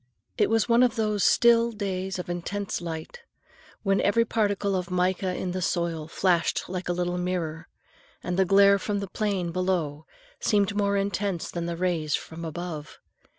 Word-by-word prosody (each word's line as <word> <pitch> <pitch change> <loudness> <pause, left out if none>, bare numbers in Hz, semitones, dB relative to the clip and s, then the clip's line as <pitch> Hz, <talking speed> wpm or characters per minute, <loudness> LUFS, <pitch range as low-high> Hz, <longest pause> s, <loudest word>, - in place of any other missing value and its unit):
It - - +2
was 225 -1 +2
one 235 0 +4
of 250 -1 +3
those 210 -3 0
still 235 0 +5
days 190 -3 -3
of 180 - -5
intense 175 +3 -3
light, 165 - -6 0.6
when 195 -1 +2
every 230 +3 +3
particle 205 -3 0
of 180 -1 -2
mica 180 0 0
in 180 - -3
the 185 +1 -3
soil 170 -3 -1
flashed 175 0 +1
like 180 0 -4
a - - +3
little 175 0 -1
mirror, 165 -3 -3 0.6
and 180 - -2
the 190 - +4
glare 200 +1 +5
from 205 +1 -2
the 200 - -4
plain 195 -5 -1
below 170 -5 -1 0.3
seemed 205 -1 +1
more 200 -1 +1
intense 195 -2 -2
than 170 -1 -3
the 170 -1 -3
rays 170 -4 0
from 165 +1 -7
above. 165 -1 -6
185 Hz, 170 wpm, -26 LUFS, 175-200 Hz, 0.6 s, still